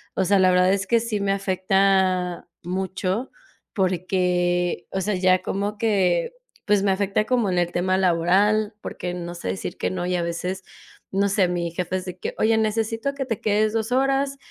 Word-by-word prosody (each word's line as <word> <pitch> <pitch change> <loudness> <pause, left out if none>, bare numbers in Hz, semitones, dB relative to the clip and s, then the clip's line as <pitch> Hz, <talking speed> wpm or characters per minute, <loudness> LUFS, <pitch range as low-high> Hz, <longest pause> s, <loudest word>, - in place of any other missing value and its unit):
O 190 - +1
sea, 195 +2 +3
la 185 0 +5
verdad 180 +1 +4
es 195 -1 0
que 230 +2 +3
sí 225 -2 -2
me 200 0 +1
afecta 190 -2 +1 0.2
mucho, 190 +5 -2 0.4
porque, 180 -2 0
o 190 - -2
sea, 205 +1 -1
ya 185 0 +3
como 205 +2 -3
que 190 -6 +1 0.3
pues, 205 -1 +3
me 200 - +3
afecta 200 +2 0
como 240 -4 +1
en 180 - 0
el 175 0 0
tema 185 +1 +1
laboral, 190 +4 +2
porque, 180 -3 -5
no 175 -1 -6
sé 170 - -5
decir 195 - -4
que - - -1
no, 180 -1 -3
y 180 0 0
a 175 - 0
veces 180 +3 -4 0.5
no 200 +1 +2
sé, 195 -2 +2
mi 170 -1 -2
jefe 180 +1 -2
de 180 -1 -8
que - - -5
oye, 220 +1 +3
necesito 225 +4 -1
que 275 -1 -4
te 225 -5 -3
quedes 215 0 +1
2, 225 +1 -2
horas, 275 +1 +1
190 Hz, 190 wpm, -23 LUFS, 180-210 Hz, 0.5 s, la